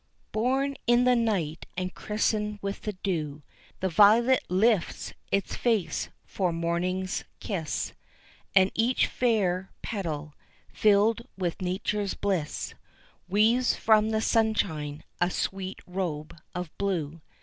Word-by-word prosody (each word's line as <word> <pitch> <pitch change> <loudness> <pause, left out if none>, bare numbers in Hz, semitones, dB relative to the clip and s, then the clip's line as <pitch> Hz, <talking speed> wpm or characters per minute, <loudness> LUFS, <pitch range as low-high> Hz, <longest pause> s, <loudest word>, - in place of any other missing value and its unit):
Born 265 +5 +1
in 240 +1 +5
the 250 0 +5
night 195 -10 0
and 185 0 -2
christened 210 0 -1
with 200 0 -3
the 210 - -3
dew, 155 -6 -3 0.4
The 190 - +2
violet 225 +8 +6
lifts 195 +1 +1 0.2
its 200 - 0
face 225 -7 0 0.2
for 185 -3 -1
morning's 175 +3 -1 0.2
kiss; 175 -8 -3 0.6
And 190 0 +6
each 235 +3 +2
fair 190 -6 +1
petal, 155 -8 -4 0.4
filled 215 +2 +4 0.2
with 180 -1 -2
Nature's 195 +2 -1
bliss, 185 -7 -2 0.6
Weaves 225 +5 +3
from 215 -1 +4
the 220 0 +1
sunshine 165 -11 0 0.2
a 175 - +4
sweet 190 +1 -3
robe 170 -5 -4 0.2
of 180 -3 -5
blue. 165 -6 -1
195 Hz, 115 wpm, -28 LUFS, 175-220 Hz, 0.6 s, violet